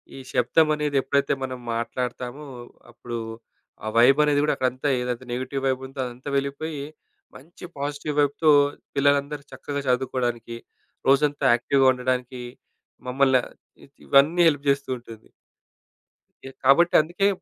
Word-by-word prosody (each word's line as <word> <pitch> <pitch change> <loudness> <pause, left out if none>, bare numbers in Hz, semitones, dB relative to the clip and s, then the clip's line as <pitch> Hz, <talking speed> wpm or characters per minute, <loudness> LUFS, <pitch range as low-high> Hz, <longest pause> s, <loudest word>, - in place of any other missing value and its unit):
ఈ - - -9
శబ్దమనేది 150 +3 +2
ఎప్పుడైతే 140 +1 +1
మనం 130 -1 -5
మాట్లాడతామో 125 +4 -4 0.5
అప్పుడూ 120 0 -7 0.7
ఆ - - -3
వైబ్ 130 +5 +6
అనేది 145 -1 +2
గూడా 150 - +2
అక్కడ 130 - 0
అంతే, 130 +3 -2
ఏదైతే 125 0 -4
నెగెటివ్ 130 +2 -4
వైబ్ 130 -1 0
ఉందో 135 0 -12
అదంతా 125 +3 -8
వెళ్ళిపోయి, 140 +2 -3 0.5
మంచి 160 +6 -15
పాజిటివ్ 145 +1 -4
వైబ్‌తో 145 +2 +3 0.4
పిల్లలందరూ 140 +1 +1
చక్కగా 140 -1 -5
చదువుకోడానికి 120 -2 -1 0.5
రోజంతా 145 +1 +2
యాక్టివ్‌గా 135 +3 +1
ఉండడానికీ 125 0 -3 0.7
మమ్మల్ని 130 0 +3 0.7
ఇవన్నీ 150 +6 +4
హెల్ప్ 145 -3 0
జేస్తూ 140 0 0
ఉంటుంది. 115 -2 -14 1.1
ఎ 135 - -7
కాబట్టి 155 +7 +5
అందుకే 175 +6 0
140 Hz, 120 wpm, -24 LUFS, 125-145 Hz, 1.1 s, వైబ్